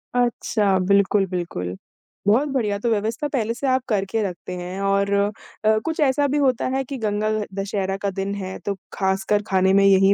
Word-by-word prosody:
अच्छा, 220 Hz, -5 st, +1 dB
बिल्कुल, 200 Hz, +1 st, +3 dB
बिल्कुल। 170 Hz, -, -4 dB, 0.5 s
बहुत 240 Hz, +8 st, +4 dB
बढ़िया, 220 Hz, -7 st, 0 dB
तो 235 Hz, -, 0 dB
व्यवस्था 225 Hz, +6 st, 0 dB
पहले 230 Hz, -6 st, -1 dB
से 270 Hz, +3 st, -3 dB
आप 260 Hz, 0 st, +2 dB
करके 210 Hz, +1 st, 0 dB
रखते 185 Hz, -1 st, -5 dB
हैं 180 Hz, +2 st, -5 dB
और 200 Hz, 0 st, +1 dB
अ, 200 Hz, +1 st, +2 dB, 0.5 s
कुछ 320 Hz, -1 st, -2 dB
ऐसा 285 Hz, 0 st, +3 dB
भी 285 Hz, +2 st, 0 dB
होता 260 Hz, -4 st, +2 dB
है 270 Hz, -, 0 dB
कि 270 Hz, +1 st, -6 dB
गंगा 215 Hz, -2 st, -1 dB
ह 210 Hz, -, -1 dB
दशहरा 195 Hz, -1 st, -2 dB
का 200 Hz, -, 0 dB
दिन 195 Hz, +1 st, -2 dB
है 190 Hz, -1 st, -5 dB
तो 200 Hz, -, -1 dB, 0.2 s
ख़ासकर 195 Hz, +1 st, +1 dB
खाने 190 Hz, 0 st, +3 dB
में 200 Hz, 0 st, +5 dB
यही 195 Hz, 0 st, +6 dB
200 Hz, 190 wpm, -22 LUFS, 195-235 Hz, 0.5 s, यही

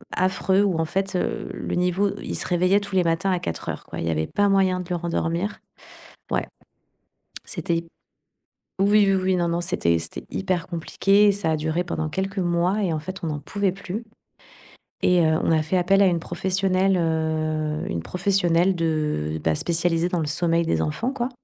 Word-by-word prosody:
affreux, 190 Hz, +1 st, +2 dB
où 195 Hz, -5 st, +1 dB
en 165 Hz, -, +1 dB
fait, 195 Hz, +3 st, -2 dB
heu, 180 Hz, -, -2 dB
le -, -, -4 dB
niveau 180 Hz, +3 st, +1 dB
il -, -, -4 dB
se -, -, -2 dB
réveillait 180 Hz, +3 st, +3 dB
tous 200 Hz, -1 st, -6 dB
les 185 Hz, -, +4 dB
matins 165 Hz, +3 st, +1 dB
à 180 Hz, -, +1 dB
4:00 80 Hz, -, -5 dB
quoi. -, -, -7 dB
Il -, -, -2 dB
y -, -, +1 dB
avait 80 Hz, 0 st, -1 dB
pas 205 Hz, 0 st, +1 dB
moyen 190 Hz, -2 st, +3 dB
de 180 Hz, -, -10 dB
le 180 Hz, -, 0 dB
rendormir. 170 Hz, +3 st, -2 dB, 0.7 s
Ouais -, -, 0 dB, 1.0 s
c'était 170 Hz, -3 st, -1 dB
hyp 165 Hz, 0 st, -5 dB, 0.9 s
oui, 205 Hz, +1 st, +5 dB
oui, 190 Hz, -, +2 dB
oui, 185 Hz, 0 st, +2 dB
non, 175 Hz, -1 st, +1 dB
non, 170 Hz, -, 0 dB
c'était 125 Hz, -, +1 dB
c'était 80 Hz, 0 st, -7 dB
hyper 185 Hz, -2 st, -1 dB
compliqué 195 Hz, +4 st, +2 dB
et -, -, +6 dB
ça 195 Hz, -5 st, -1 dB
a 155 Hz, -, +1 dB
duré 160 Hz, +3 st, -1 dB
pendant 160 Hz, -3 st, -3 dB
quelques 190 Hz, +5 st, -3 dB
mois 180 Hz, +3 st, +1 dB
et 180 Hz, -5 st, 0 dB
en 155 Hz, -, -1 dB
fait, 185 Hz, +2 st, -6 dB
on -, -, -1 dB
en 150 Hz, -1 st, -3 dB
pouvait 195 Hz, +5 st, -1 dB
plus 200 Hz, +3 st, -6 dB, 1.0 s
et 180 Hz, -2 st, +4 dB
heu, 160 Hz, 0 st, +2 dB
on -, -, +2 dB
a 160 Hz, -1 st, +3 dB
fait 160 Hz, +5 st, -1 dB
appel 195 Hz, +2 st, +4 dB
à -, -, +5 dB
une 175 Hz, -3 st, +2 dB
professionnelle, 190 Hz, +2 st, +1 dB
heu, 155 Hz, -2 st, -1 dB
une 85 Hz, -1 st, -3 dB
professionnelle 180 Hz, -, +2 dB
de 150 Hz, -, -1 dB
bah 80 Hz, -1 st, +2 dB
spécialisée 170 Hz, -, +1 dB
dans 180 Hz, -1 st, -1 dB
le 155 Hz, -, -1 dB
sommeil 165 Hz, +2 st, +1 dB
des -, -, +1 dB
enfants 230 Hz, -, -2 dB
quoi 245 Hz, -2 st, -2 dB
175 Hz, 200 wpm, -24 LUFS, 160-190 Hz, 1.0 s, et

